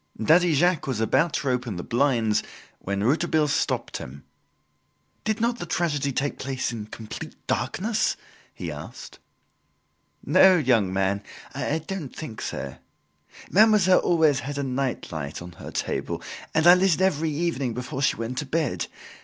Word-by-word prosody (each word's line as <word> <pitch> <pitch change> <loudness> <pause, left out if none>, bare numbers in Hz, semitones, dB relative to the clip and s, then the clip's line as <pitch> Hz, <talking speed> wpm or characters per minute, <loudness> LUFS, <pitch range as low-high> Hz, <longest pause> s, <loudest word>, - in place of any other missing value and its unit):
Daddy 165 +7 +4
Jacques 175 0 +2
was 130 -5 -1
about 130 +9 +2
to 140 - -1
open 125 -4 -2
the 90 - -5
blinds 120 -4 +2 0.4
when 100 +1 -2
Rouletabille 155 +4 +2
stopped - - -1
him. 70 +2 -9 1.0
"Did 215 +1 -1
not 235 +1 0
the 175 - -5
tragedy 145 -5 0
take 140 +2 -2
place 130 -2 -2
in 110 -3 -6
complete 110 0 -8
darkness?" 210 - 0 0.3
he - - -6
asked. - - -9 1.1
"No, 190 -1 +6
young 120 - +2
man, 95 +1 0 0.3
I 150 - -1
don't 180 -8 -5
think 120 -9 -7
so. - - -5 0.7
Mademoiselle 205 -3 +6
always 160 -5 +3
had 145 0 -5
a 140 - -1
nightlight 125 - -3
on 90 0 -9
her 85 - -10
table, - - -3 0.3
and 160 +1 +3
I 175 - +10
lit 180 -1 +4
it - - -4
every 165 -4 +2
evening 145 -6 -1
before 125 +2 -4
she 135 - +3
went 115 +3 -4
to 150 - -4
bed. 155 -2 -1
140 Hz, 155 wpm, -25 LUFS, 120-170 Hz, 1.1 s, I